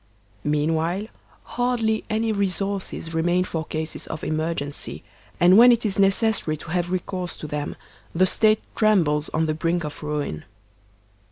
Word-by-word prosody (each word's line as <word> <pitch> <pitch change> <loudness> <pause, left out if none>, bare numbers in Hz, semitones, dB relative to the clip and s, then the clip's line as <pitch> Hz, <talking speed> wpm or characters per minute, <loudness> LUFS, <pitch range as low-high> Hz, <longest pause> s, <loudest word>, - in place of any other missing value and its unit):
Meanwhile, 160 +6 0 0.4
hardly 235 -3 0
any 220 +1 0
resources 195 -4 -1
remain 175 +3 +2
for 165 -3 -3
cases 155 +1 -5
of 155 - -6
emergency; 155 -2 -3 0.4
and 180 +4 +7
when 245 +1 +9
it 235 -1 +1
is 200 -1 -1
necessary 195 -5 +2
to 160 - -9
have 175 0 0
recourse 180 -1 -3
to - - -7
them 145 -1 -4 0.4
the 185 +3 +3
State 215 +3 +4
trembles 165 -9 +2
on 160 - 0
the 155 - 0
brink 170 +2 -1
of 150 -1 -6
ruin. 145 - -3
175 Hz, 145 wpm, -23 LUFS, 155-200 Hz, 0.4 s, when